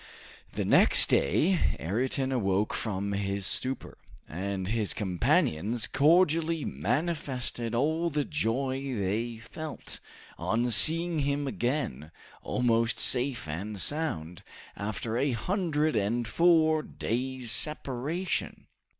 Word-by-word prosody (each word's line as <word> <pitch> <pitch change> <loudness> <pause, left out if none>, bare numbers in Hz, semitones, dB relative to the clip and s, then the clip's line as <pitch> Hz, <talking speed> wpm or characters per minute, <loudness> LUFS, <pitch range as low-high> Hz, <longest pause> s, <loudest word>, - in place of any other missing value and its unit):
The - - -2
next - - +6
day 170 - +2
Ayrton 130 - -1
awoke 100 -4 0
from 100 -2 -3
his 100 0 0
torpor, 130 +1 -6 0.3
and 95 +3 -4
his 110 -2 -1
companions 100 +2 0
cordially 165 +1 +2
manifested 125 - -2
all 160 +7 +1
the 150 -2 -1
joy 135 -1 -1 0.2
they 110 +4 -2
felt, 150 +7 -8 0.4
on 120 +2 0
seeing 165 +7 +5
him 140 0 -1
again, 120 - -2 0.3
almost 115 -1 +1
safe 125 -6 0
and 100 +7 -5
sound, 90 - -3 0.3
after 110 +2 -4
a 135 -1 +1
hundred 155 - -1
and 110 +3 0
four 160 +1 +3
days 130 -2 -3
separation. 150 +5 -2
125 Hz, 105 wpm, -28 LUFS, 105-150 Hz, 0.4 s, next